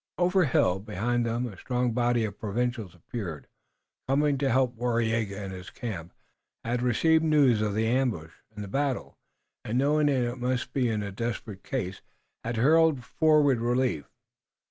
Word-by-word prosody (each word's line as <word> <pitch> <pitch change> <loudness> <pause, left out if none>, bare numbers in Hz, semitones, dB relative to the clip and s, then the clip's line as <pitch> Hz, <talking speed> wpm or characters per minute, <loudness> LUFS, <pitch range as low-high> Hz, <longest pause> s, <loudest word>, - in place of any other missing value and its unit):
Over 180 +2 +3
a 165 - +3
hill 95 -7 +2
behind 110 +4 -1
them 120 +2 -1
a 110 -5 -7
strong 125 +4 -1
body 120 -1 +1
of 100 -1 -7
provincials 110 -3 -2
appeared 90 -3 -6 0.6
coming 140 +1 +2
to 140 -1 +1
help. 130 0 +2
Waraiyageh 115 -2 0 0.2
in 95 - -6
his 95 0 -8
camp 95 -5 -6 0.5
had 120 +1 -1
received 160 +7 +3
news 145 -8 +4
of 105 -1 -1
ambush 110 -8 0 0.2
and 105 -2 -7
battle, 140 0 -2 0.4
and 115 +3 -2
knowing 145 +3 +3
that 145 - +3
his 120 -2 0
men - - -12
must 125 0 -1
be 125 -3 +1
in 110 -2 -1
desperate 110 -2 -5
case 95 -8 -4 0.4
had 115 0 -3
hurried 155 +1 +4
forward 150 -5 +3
relief. 120 - 0
120 Hz, 160 wpm, -27 LUFS, 110-135 Hz, 0.6 s, news